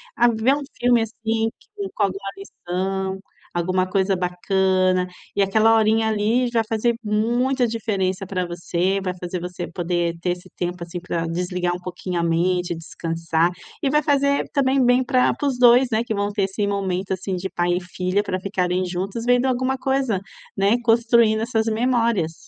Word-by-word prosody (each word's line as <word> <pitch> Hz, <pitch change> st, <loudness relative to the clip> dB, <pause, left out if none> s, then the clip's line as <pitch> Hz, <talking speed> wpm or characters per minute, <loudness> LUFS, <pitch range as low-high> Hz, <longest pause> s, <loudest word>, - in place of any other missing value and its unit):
A 240 Hz, -, +4 dB
ver 230 Hz, +3 st, +2 dB
um 290 Hz, -, -4 dB, 0.2 s
filme, 240 Hz, -1 st, +4 dB
assim, 225 Hz, 0 st, -1 dB
que -, -, -25 dB, 0.3 s
com 210 Hz, -, +1 dB
alguma 195 Hz, 0 st, -2 dB
lição, 190 Hz, 0 st, -3 dB, 0.4 s
alguma 185 Hz, +2 st, 0 dB
coisa 195 Hz, 0 st, +1 dB
bacana. 185 Hz, 0 st, +1 dB, 0.3 s
E 200 Hz, -, +2 dB
aquela 220 Hz, +3 st, +4 dB
horinha 220 Hz, 0 st, +3 dB
ali 220 Hz, +4 st, +1 dB
já 230 Hz, -1 st, +2 dB
fazer 230 Hz, +1 st, +1 dB
muita 240 Hz, +5 st, +1 dB
diferença 195 Hz, -4 st, -1 dB
para 185 Hz, -2 st, -2 dB
você, 175 Hz, +2 st, -1 dB
vai 185 Hz, -1 st, -2 dB
fazer 180 Hz, 0 st, -4 dB
você 180 Hz, 0 st, -5 dB
poder 170 Hz, -1 st, -1 dB
ter 180 Hz, -, 0 dB
esse 180 Hz, -, -12 dB
tempo, 175 Hz, 0 st, -3 dB
assim, 175 Hz, +1 st, -6 dB
para 170 Hz, -1 st, -3 dB
desligar 175 Hz, +1 st, -1 dB
um 180 Hz, -, -7 dB
pouquinho 180 Hz, 0 st, -4 dB
a 170 Hz, -, 0 dB
mente, 175 Hz, +1 st, +1 dB
descansar. 165 Hz, 0 st, -1 dB, 0.3 s
E 275 Hz, -, +1 dB
vai 300 Hz, +2 st, +2 dB
fazer, 280 Hz, -1 st, +2 dB
também, 270 Hz, -1 st, +3 dB
bem 245 Hz, +1 st, +4 dB
pra 255 Hz, -1 st, +2 dB
para 290 Hz, -, -2 dB
os 265 Hz, -3 st, -1 dB
2, 245 Hz, +1 st, +6 dB
né, 220 Hz, +1 st, +1 dB
que 235 Hz, -2 st, -3 dB
vão 205 Hz, 0 st, -1 dB
ter 200 Hz, -1 st, 0 dB
esse 195 Hz, +2 st, -1 dB
momento 195 Hz, -1 st, -2 dB
assim 190 Hz, +1 st, -3 dB
de 190 Hz, +1 st, -4 dB
pai 175 Hz, 0 st, 0 dB
e -, -, -3 dB
filha 185 Hz, +2 st, -1 dB
para 185 Hz, -2 st, -2 dB
ficarem 185 Hz, -2 st, -1 dB
juntos 190 Hz, +6 st, -4 dB
vendo 245 Hz, +1 st, +3 dB
alguma 260 Hz, +1 st, 0 dB
coisa, 265 Hz, -7 st, 0 dB, 0.4 s
né, 200 Hz, +3 st, +3 dB
construindo 230 Hz, -1 st, +4 dB
essas 225 Hz, -1 st, 0 dB
memórias. 230 Hz, -7 st, +1 dB
195 Hz, 180 wpm, -22 LUFS, 180-230 Hz, 0.4 s, 2